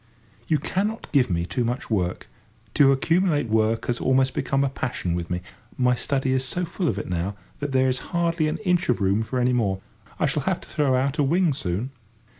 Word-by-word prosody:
You 155 - +3
cannot 205 +9 -2
give 135 -6 +3
me 85 -1 0
too 90 +8 -1
much 120 +1 -3
work; 90 -4 -1 0.5
to 140 -2 +6
accumulate 155 - +2
work 110 +1 +1
has 120 -1 -1
almost 130 0 +3
become 135 0 0
a 140 - +1
passion 120 -9 -3
with 85 -1 -3
me: 90 0 -2 0.4
my 125 -1 +3
study 135 +1 0
is 130 0 +1
so 175 +7 -2
full 170 +1 -2
of 100 - 0
it - - -4
now, 90 +3 -2 0.2
that 145 -1 -3
there 130 0 +3
is 130 0 +1
hardly 170 -2 +1
an 155 - -1
inch 180 -4 +2
of 125 - +2
room 100 +2 +2
for 120 +3 -3
any 125 0 +2
more. 100 -6 +1 0.4
I - - +2
shall - - 0
have - - 0
to - - -13
throw 140 -3 +1
out 135 +3 0
a - - +5
wing 165 +3 +2
soon. 105 +1 -3
130 Hz, 220 wpm, -24 LUFS, 110-150 Hz, 0.5 s, to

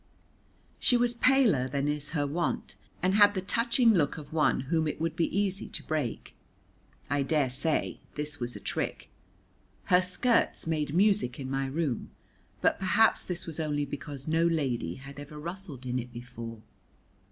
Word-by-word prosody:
She 245 - +4
was 240 0 +2
paler 235 - +4
than 140 +2 -1
is 150 0 -2
her 145 - +1
wont, 165 +5 -2 0.3
and 185 +1 +3
had 205 0 +6
the 185 - 0
touching 230 +4 +3
look 155 -6 +1
of 150 0 -9
one 155 -4 +2
whom 160 +4 0
it 150 - -3
would 165 0 -1
be 170 -2 +2
easy 195 -1 0
to - - -5
break. 150 -7 -3 0.7
I 145 0 +1
daresay 140 +1 0 0.2
this 150 0 -2
was 120 0 -3
a - - -6
trick. - - -3 0.8
Her 180 - +7
skirts 205 +6 +1
made 155 -2 -1
music 195 - +3
in 130 -1 -5
my 135 0 0
room, 140 -3 -2 0.5
but - - +2
perhaps 205 +4 +3
this 180 -1 -4
was 165 -1 -5
only 145 -2 0
because 140 0 -6
no 165 +2 +3
lady 130 - -1
had 140 +1 -10
ever 145 +1 -9
rustled 170 -4 -7
in 125 0 -1
it 125 0 -7
before. 115 -2 -8
150 Hz, 165 wpm, -29 LUFS, 135-185 Hz, 0.8 s, Her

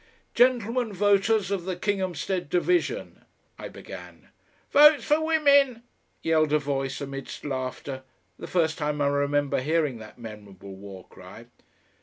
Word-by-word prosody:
"Gentlemen 245 -1 +2
voters 205 +1 +2
of 190 -4 -2
the 185 -1 -2
Kinghamstead 185 -2 -2
Division," 340 - -1 0.4
I - - -6
began. - - -12 0.4
"Votes 300 +1 +7
for 305 +2 +2
Women!" 280 -6 +3 0.4
yelled 155 -2 +2
a - - +5
voice, 135 -2 -3
amidst 135 0 -7
laughter 130 0 -4 0.4
the - - -7
first 165 -2 0
time 150 -1 -2
I 145 - +2
remember 145 -1 0
hearing 150 -4 0
that 110 -1 -12
memorable 100 -4 -11
war 95 -1 -11
cry. - - -13
160 Hz, 130 wpm, -26 LUFS, 135-220 Hz, 0.4 s, Votes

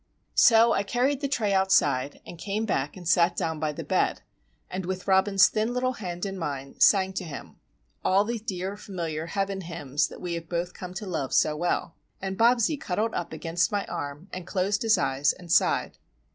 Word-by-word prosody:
So 230 0 +6
I - - +2
carried 255 +6 0
the 280 - 0
tray 220 -7 0
outside, 145 -8 +2
and 170 - -10
came 210 +4 -2
back 150 -5 -1
and 175 -2 -8
sat 175 +1 +4
down 160 -1 -2
by 155 -1 -1
the 150 - -6
bed, - - 0 0.4
and 185 +1 -4
with 185 +1 -4
Robin's 195 +1 +5
thin 220 +3 -1
little 255 +1 0
hand 180 -5 -5
in 195 -1 -5
mine, 140 -4 -5
sang 190 -2 +5
to 185 - -3
him,—all 180 +5 -3
the 235 +1 -2
dear, 195 -3 -4
familiar 165 -6 -4
"heaven 195 +2 -2
hymns" 155 -5 -1
that - - -11
we 175 -1 -4
have 165 -1 -6
both 175 +1 -2
come 180 0 -8
to 205 - -5
love 155 -8 -3
so 150 - +3
well. 170 +1 -1 0.3
And 190 0 -4
Bobsie 240 +6 +3
cuddled 215 +5 -1
up 175 - -3
against 165 +2 -1
my 205 -1 -1
arm 145 +5 -6
and 180 -1 -6
closed 195 +2 0
his 225 -1 +4
eyes 135 +2 +1
and 175 -2 -10
sighed. - - +2
185 Hz, 195 wpm, -26 LUFS, 165-205 Hz, 0.4 s, So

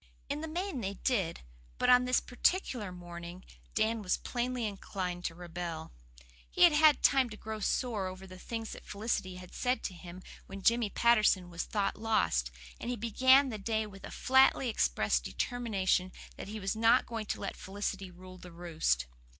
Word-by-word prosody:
In 290 +2 -2
the 320 - -4
main 345 -3 -3
they 195 -1 -3
did; 195 -8 -1 0.4
but - - +1
on 250 0 +6
this 250 0 +3
particular 245 - 0
morning 175 0 -9 0.3
Dan 220 0 +1
was 185 -3 0
plainly 245 -1 -2
inclined 185 -3 -4
to 165 - -2
rebel. 170 -2 -6 0.6
He - - +3
had 345 - +8
had 300 -1 +5
time 265 -3 +4
to 215 - -9
grow 220 0 -6
sore 215 -2 -1
over 185 +1 -8
the 185 -1 -11
things 225 +2 -5
that - - -9
Felicity 200 -3 -2
had 180 0 -11
said 250 0 0
to 190 - -3
him 180 +1 -10 0.2
when 195 0 -8
Jimmy 230 -1 +3
Patterson 210 -5 +3
was 170 -1 -3
thought 200 -2 -1
lost, 215 - +1 0.3
and - - -5
he 245 - -1
began 260 +5 +4
the 215 -3 -5
day 220 +1 -1
with 195 -2 -12
a - - -7
flatly 265 -1 +4
expressed - - +1
determination 195 - 0 0.2
that - - -8
he 215 +2 -6
was 195 +1 -2
not 230 +3 +4
going 225 -2 -5
to - - -3
let 200 - -4
Felicity 195 -1 -4
rule 185 +1 -13
the 180 - -11
roost. 165 - 0
205 Hz, 185 wpm, -31 LUFS, 180-240 Hz, 0.6 s, had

